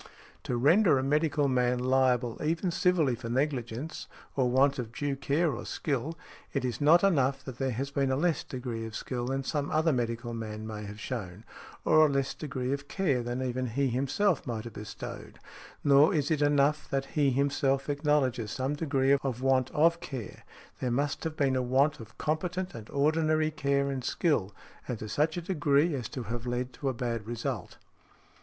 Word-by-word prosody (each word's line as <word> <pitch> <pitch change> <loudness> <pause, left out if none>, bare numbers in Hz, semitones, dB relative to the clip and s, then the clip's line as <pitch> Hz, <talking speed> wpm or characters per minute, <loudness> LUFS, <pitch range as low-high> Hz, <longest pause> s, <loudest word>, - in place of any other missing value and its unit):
To 125 - -1
render 155 - +5
a 130 - 0
medical 150 0 +2
man 125 -1 +2
liable 125 -2 +1
even 165 +4 0
civilly 175 -7 +2
for 115 0 -6
negligence, 130 +1 -2 0.3
or 130 -3 +2
want 135 +2 +3
of 115 -3 -4
due 140 +3 -2
care 145 +4 +1
or - - -5
skill, 150 +3 -3 0.4
it 140 -2 -1
is 125 +3 -3
not 165 +5 +6
enough 140 -7 +2
that 130 -2 -8
there 135 -1 0
has 135 +3 -3
been 140 -1 +1
a 130 - +2
less 165 +1 +1
degree 125 -3 -5
of 110 - -9
skill 120 -2 -3
than 135 +1 -1
some 145 +1 -2
other 160 0 +2
medical 120 -1 -2
man 110 -1 -5
may 105 -1 -6
have 105 +1 -8
shown, 105 -4 -5 0.4
or 155 - +6
a 155 - +5
less 140 -1 0
degree 135 -3 -3
of 140 0 -5
care 150 -11 0
than 120 +2 -3
even 130 0 -2
he 135 +4 0
himself 140 - +1
might 115 -3 -3
have 115 -2 -8
bestowed, 105 0 -8 0.5
nor 145 +3 +5
is 145 0 0
it 155 -2 +1
enough 145 +1 +2
that 135 0 -1
he 145 -3 +3
himself 135 0 +1
acknowledges 145 -6 +1
some 130 +5 -2
degree 140 -3 +2
of 130 -2 -3
want 130 -1 +3
of 170 +3 +3
care; 130 - -7 0.4
there 125 - -1
must 140 +4 -1
have 160 -1 -3
been 135 -2 +2
a 130 - +1
want 135 +4 +2
of 110 -1 -12
competent 180 +4 -2
and 115 -2 -9
ordinary 155 +2 +2
care 140 -1 0
and 130 -2 -4
skill, 125 - +1 0.4
and 125 - -3
to 110 - -7
such 150 - 0
a 175 - -3
degree 150 -2 +2
as 125 -6 -3
to 130 - -5
have 115 +2 -5
led 125 +1 -2
to 140 - -2
a - - +1
bad 115 -3 -3
result. 120 -1 -4
135 Hz, 190 wpm, -29 LUFS, 125-150 Hz, 0.5 s, not